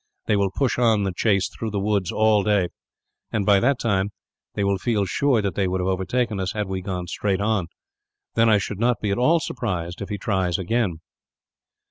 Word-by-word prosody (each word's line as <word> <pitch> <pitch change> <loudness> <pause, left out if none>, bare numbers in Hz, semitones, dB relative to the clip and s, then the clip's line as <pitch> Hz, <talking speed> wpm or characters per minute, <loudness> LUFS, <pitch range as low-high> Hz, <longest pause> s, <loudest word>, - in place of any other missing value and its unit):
They 105 - +2
will 100 -1 +2
push 125 +5 -1
on 110 -4 +3
the 95 -2 -1
chase 100 -3 +2
through 115 - -5
the 100 -1 -2
woods 100 -2 0
all 110 -1 +3
day 100 -3 +2 0.6
and, 105 -3 -1
by 100 -1 +5
that 130 +5 +2
time, 100 -4 0 0.5
they 100 - 0
will 100 -1 +1
feel 105 -2 0
sure 120 +4 +1
that 100 - -1
they 95 -2 0
would 95 +1 -1
have 90 - -1
overtaken 100 +4 -1
us, 95 -1 -2
had 105 -1 -2
we 95 -1 -3
gone 90 -2 -4
straight 95 +2 -1
on. 100 -4 0 0.7
Then 115 0 +4
I 105 - +5
should 100 0 -4
not 120 0 +2
be 105 - -1
at 100 - 0
all 160 +7 +4
surprised 90 - -4
if 100 - -5
he 105 - -3
tries 95 -3 0
here, 95 - -1
again." 95 -5 -1
100 Hz, 215 wpm, -23 LUFS, 95-110 Hz, 0.7 s, by